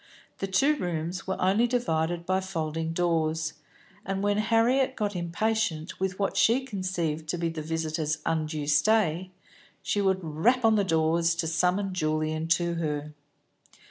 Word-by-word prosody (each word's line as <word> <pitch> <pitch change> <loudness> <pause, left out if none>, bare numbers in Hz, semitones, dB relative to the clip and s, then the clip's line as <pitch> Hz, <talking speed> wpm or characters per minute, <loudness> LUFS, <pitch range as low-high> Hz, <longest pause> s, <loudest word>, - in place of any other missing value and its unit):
The 195 - -2
two 275 +11 +3
rooms 175 - -3
were 190 - -2
only 200 +6 +3
divided 170 -8 -1
by 185 +1 +1
folding 165 -3 -3
doors, 160 -2 0 0.5
and 195 0 -3
when 205 0 +2
Harriet 240 +5 +2
got 205 -2 -2
impatient 175 -1 -1
with 190 0 -1
what 200 -1 -1
she 230 +7 +3
conceived 175 - -3
to 175 - -1
be 170 -1 -1
the 165 -1 -5
visitor's 155 -1 -2
undue 155 -2 -1
stay, 175 +3 +2 0.5
she 205 - 0
would 190 -1 +1
rap 215 +11 +2
on 220 - +5
the 210 -2 +3
doors, 165 -1 +2
to 170 - -2
summon 180 +4 +1
Julian 155 -1 -1
to 170 +1 +2
her. 150 -2 -3
175 Hz, 150 wpm, -27 LUFS, 160-200 Hz, 0.5 s, on